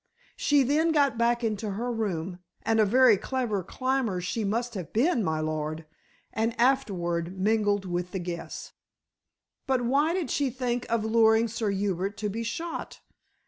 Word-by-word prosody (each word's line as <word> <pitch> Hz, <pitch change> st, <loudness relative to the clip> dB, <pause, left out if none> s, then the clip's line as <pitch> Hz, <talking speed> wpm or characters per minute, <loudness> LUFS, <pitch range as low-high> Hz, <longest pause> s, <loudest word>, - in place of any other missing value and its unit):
She 290 Hz, -2 st, +3 dB
then 305 Hz, +5 st, +2 dB
got 280 Hz, -7 st, +2 dB
back 235 Hz, +1 st, +2 dB
into 215 Hz, -2 st, -2 dB
her 240 Hz, +5 st, -2 dB
room 185 Hz, -6 st, -3 dB, 0.2 s
and 225 Hz, 0 st, +2 dB
a 215 Hz, -, +6 dB
very 240 Hz, 0 st, +5 dB
clever 240 Hz, -4 st, -2 dB
climber 255 Hz, -4 st, -1 dB
she 185 Hz, +5 st, -2 dB
must 235 Hz, +4 st, -1 dB
have 185 Hz, -6 st, -6 dB
been, 245 Hz, +1 st, +2 dB
my 160 Hz, -3 st, 0 dB
lord 155 Hz, 0 st, -3 dB, 0.5 s
and 225 Hz, +2 st, -1 dB
afterward 185 Hz, -9 st, 0 dB
mingled 205 Hz, -1 st, +1 dB
with 175 Hz, 0 st, -2 dB
the 190 Hz, -, -4 dB
guests." 175 Hz, -1 st, -6 dB, 0.9 s
"But 260 Hz, -2 st, +1 dB
why 290 Hz, +7 st, +2 dB
did 365 Hz, -4 st, -2 dB
she 280 Hz, -2 st, +1 dB
think 245 Hz, -1 st, -3 dB
of 230 Hz, -2 st, +1 dB
luring 220 Hz, 0 st, +4 dB
Sir 225 Hz, -1 st, -2 dB
Hubert 195 Hz, 0 st, -1 dB
to 210 Hz, 0 st, -2 dB
be 225 Hz, +3 st, -4 dB
shot?" 330 Hz, +9 st, -5 dB
220 Hz, 160 wpm, -27 LUFS, 190-250 Hz, 0.9 s, a